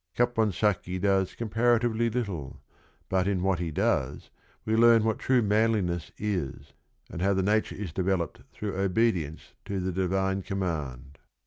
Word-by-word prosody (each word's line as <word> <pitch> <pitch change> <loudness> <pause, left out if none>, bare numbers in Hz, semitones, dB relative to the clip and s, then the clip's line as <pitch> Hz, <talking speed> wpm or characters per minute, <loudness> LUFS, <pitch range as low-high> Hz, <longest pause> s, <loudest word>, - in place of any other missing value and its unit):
Caponsacchi 105 -6 +1
does 95 -1 +1
comparatively 115 0 +1
little, 100 - -4 0.5
but 95 0 +1
in 95 -3 0
what 95 -2 +1
he 85 -2 -2
does 70 -2 -1 0.3
we 110 - +1
learn 115 -1 +6
what 110 -1 0
true 130 -2 +2
manliness 105 -6 +1
is 95 -10 -3 0.4
and 85 - -5
how 100 +1 +2
the 95 - +1
nature 105 +3 +1
is 95 -6 -6
developed 95 -1 -1
through 105 -2 -5
obedience 95 -5 0
to 100 -1 -3
the 95 0 -1
divine 95 +1 0
command. 75 -9 -4
95 Hz, 140 wpm, -28 LUFS, 90-110 Hz, 0.5 s, learn